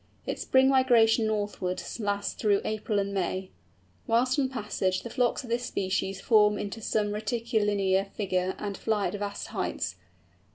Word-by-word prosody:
Its - - -3
spring 265 0 +4
migration 240 -4 +4
northwards 205 -2 -3
lasts 205 -1 -1
through 205 -3 +2
April 215 0 -1
and 200 0 -1
May. 185 0 -2 0.6
Whilst 250 +4 +2
on 265 -2 +1
passage 205 -6 -1
the 235 - -7
flocks 250 0 +1
of 235 - -8
this 240 +1 0
species 190 0 -1
form 210 -2 +4
into 205 +2 -5
some 210 -1 0
rectilinear 210 -3 +1
figure 185 -2 -2
and 205 -1 -4
fly 215 -1 0
at - - -8
vast 205 0 -4
heights. - - -3
210 Hz, 155 wpm, -28 LUFS, 200-230 Hz, 0.6 s, spring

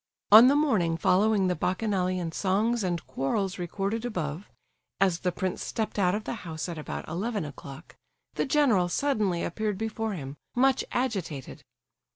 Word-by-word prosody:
On 220 +4 +10
the 275 - +5
morning 210 - +2
following 200 +3 +3
the 180 -1 +1
bacchanalian 185 -1 -1
songs 210 +6 +1
and 175 -3 -2
quarrels 190 +7 -2
recorded 195 +5 -2
above, 180 -6 -4 0.5
as 185 -3 +2
the 180 - 0
prince 185 +1 -3
stepped 220 -2 -3
out 180 0 +3
of 215 - -3
the - - -4
house 160 -2 -5
at 170 -3 -5
about 150 - -6
eleven 200 +3 -2
o'clock, 140 +2 -10 0.4
the - - -1
general 250 -11 +3
suddenly 210 -8 0
appeared 210 +2 -2
before 220 0 -3
him, 140 -5 -7 0.2
much 265 +1 +3
agitated. 190 - -3
190 Hz, 155 wpm, -27 LUFS, 170-220 Hz, 0.5 s, On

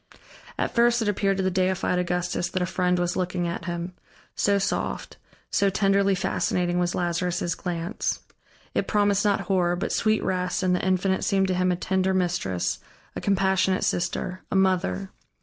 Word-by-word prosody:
At - - -1
first 235 0 +4
it - - -2
appeared 195 -1 +1
to 190 - 0
the 185 - +1
deified 185 0 +1
Augustus 180 0 -1
that 185 - -2
a - - +1
friend 180 0 +1
was 175 0 0
looking 180 -1 -1
at 170 0 -4
him, 175 0 -4 0.4
so 200 -1 +2
soft, 195 - -2 0.3
so 200 -1 +3
tenderly 195 0 +2
fascinating 180 -1 0
was 175 0 0
Lazarus' 175 0 -1
glance. 175 +4 -3 0.5
It - - 0
promised 205 -1 +2
not 205 -2 +2
horror, 180 -2 +1
but 175 - -3
sweet 215 0 +1
rest 180 0 -1
and 180 -1 +3
the - - -2
Infinite 190 0 +1
seemed 195 -2 +2
to - - +2
him 185 0 +2
a - - +1
tender 190 +1 0
mistress, 170 - -1 0.4
a - - -4
compassionate 190 -1 +2
sister, 180 +1 -1
a - - -2
mother. 175 - +1
185 Hz, 170 wpm, -25 LUFS, 175-195 Hz, 0.5 s, first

